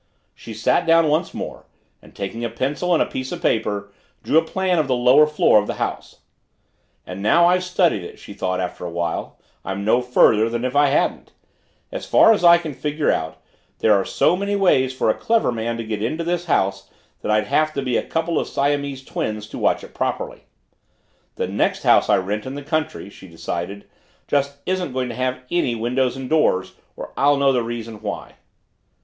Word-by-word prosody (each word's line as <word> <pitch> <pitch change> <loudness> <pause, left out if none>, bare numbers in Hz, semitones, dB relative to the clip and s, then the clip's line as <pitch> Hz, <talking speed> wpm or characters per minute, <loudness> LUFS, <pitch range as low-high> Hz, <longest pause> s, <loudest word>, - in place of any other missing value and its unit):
She 115 - -10
sat 110 +8 +1
down 165 -1 +5
once 155 +2 0
more, - - -7 0.3
and - - -18
taking 105 +4 -5
a 115 - -1
pencil 145 +9 -1
and - - +3
a - - -4
piece 130 0 -5
of - - -4
paper 105 -2 -1 0.3
drew 160 - +4
a - - -2
plan 185 +1 0
of 150 - 0
the 130 - +1
lower 125 +5 +5
floor 150 -7 +4
of 105 - -3
the - - -3
house. - - -5 0.8
And 90 +2 -7
now 170 +12 +4
I've 180 +1 +3
studied 180 - +1
it, - - -10
she - - -11
thought 95 -2 -2
after 90 -1 -4
a 90 - -4
while, 85 0 -3 0.3
I'm 95 +2 -4
no 120 +3 +3
further 115 -3 +4
than 120 +1 -3
if 130 +2 -3
I 145 0 +5
hadn't. 140 - -1 0.6
As - - -6
far 225 - +6
as 205 - -2
I 170 0 +8
can 165 -3 -6
figure 150 +2 -1
out, 80 0 -4 0.3
there 110 - +3
are 100 -1 +2
so 165 - +2
many 200 +2 -2
ways 135 -10 +3
for 130 -4 +1
a - - 0
clever 225 - +1
man 115 0 -3
to 115 - -4
get 110 -2 -4
into 155 +10 -2
this 175 +1 -2
house 100 - 0 0.3
that - - -4
I'd 105 0 +2
have 155 +8 +1
to 140 - -3
be 125 -2 -1
a - - +2
couple 165 0 -1
of - - -3
Siamese 140 -1 -1
twins 105 -1 -4
to - - -7
watch - - +1
it - - -12
properly. - - -3 0.9
The - - -2
next - - -1
house - - +4
I - - +5
rent 105 +5 -3
in 135 - -5
the 145 - -6
country, 145 - -3
she 95 - -14
decided, 85 +3 -6 0.4
just 140 0 0
isn't 185 -7 -2
going 130 -1 -2
to 115 - -6
have 130 0 -2
any 155 -9 +1
windows 125 +3 -1
and 135 -1 -6
doors 95 -12 +1 0.2
or - - -8
I'll 145 +1 +3
know 140 -1 +3
the 125 - +1
reason 115 -2 -6
why. - - -6
130 Hz, 210 wpm, -21 LUFS, 105-155 Hz, 0.9 s, I